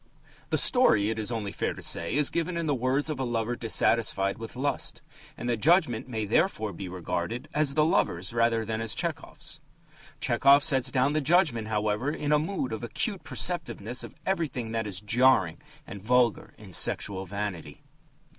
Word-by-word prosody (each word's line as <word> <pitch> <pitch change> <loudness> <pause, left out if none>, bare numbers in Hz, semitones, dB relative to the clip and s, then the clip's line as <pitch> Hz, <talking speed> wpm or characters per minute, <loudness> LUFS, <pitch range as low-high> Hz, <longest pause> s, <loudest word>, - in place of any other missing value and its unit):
The - - +1
story, 110 - +4
it 110 - -4
is 110 +2 -2
only 110 -4 -3
fair - - -2
to - - -10
say, 85 +8 0
is 145 -1 +1
given 170 +1 -2
in 170 - -2
the 150 - +1
words 130 +3 0
of 150 -4 -3
a - - 0
lover 120 -1 -1
dissatisfied 110 -3 +1
with 115 +1 -8
lust, 140 +3 -3 0.3
and 120 - -5
the 120 - +1
judgment 145 - +2
may 110 -3 -2
therefore 110 - +1
be 90 +2 -7
regarded 90 +6 -4
as 150 -2 +1
the 155 0 +4
lover's 90 - 0
rather 115 -1 +2
than 110 +1 -3
as 115 -1 -1
Tchehov's. - - -5 0.6
Tchehov 140 +1 +4
sets 135 -5 +2
down 130 +2 +1
the 155 - +1
judgment, 145 - +2
however, 105 +4 -1
in 150 -1 -2
a 150 - +5
mood 155 - -3
of 110 - -4
acute 190 - -3
perceptiveness 125 - -1
of - - -10
everything 150 -11 -2
that 115 -1 -2
is 95 -1 -3
jarring 115 - +3 0.2
and 100 - -9
vulgar 120 0 +1
in - - -13
sexual 95 -2 +1
vanity. 100 -3 -5
120 Hz, 180 wpm, -27 LUFS, 105-145 Hz, 0.6 s, a